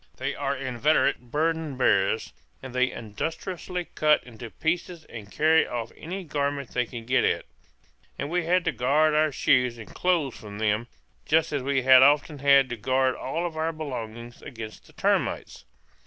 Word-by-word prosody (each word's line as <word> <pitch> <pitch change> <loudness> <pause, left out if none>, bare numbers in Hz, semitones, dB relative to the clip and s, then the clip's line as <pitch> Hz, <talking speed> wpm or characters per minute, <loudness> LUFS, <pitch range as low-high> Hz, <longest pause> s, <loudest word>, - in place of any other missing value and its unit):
They - - -2
are 140 0 -2
inveterate 130 -1 +1
burden 155 0 -1
bearers, 100 -3 +1 0.3
and 130 - -8
they 130 0 +2
industriously 165 - -5
cut 150 0 +3
into 120 -1 -10
pieces 170 +3 -3
and 105 -3 -10
carry 160 +1 +3
off 115 -2 -4
any 185 +4 -6
garment 140 -4 -2
they 125 -1 0
can 115 -1 -8
get 130 +2 +2
at; - - 0 0.7
and 140 - -3
we 175 -1 0
had 180 +1 +2
to 165 - +2
guard 150 +5 +2
our 155 0 +3
shoes 125 -2 +2
and 110 -4 -11
clothes 170 -8 0
from 105 -2 -10
them, 110 +2 0 0.4
just 160 -1 +2
as 145 - 0
we 135 0 0
had 130 0 +8
often 145 +2 +4
had 140 -1 +5
to 120 - -4
guard 130 +3 +1
all 165 +6 -3
our 160 +1 -1
belongings 120 -6 -7
against 110 -5 -9
the - - -19
termites. - - -1
135 Hz, 170 wpm, -26 LUFS, 120-155 Hz, 0.7 s, had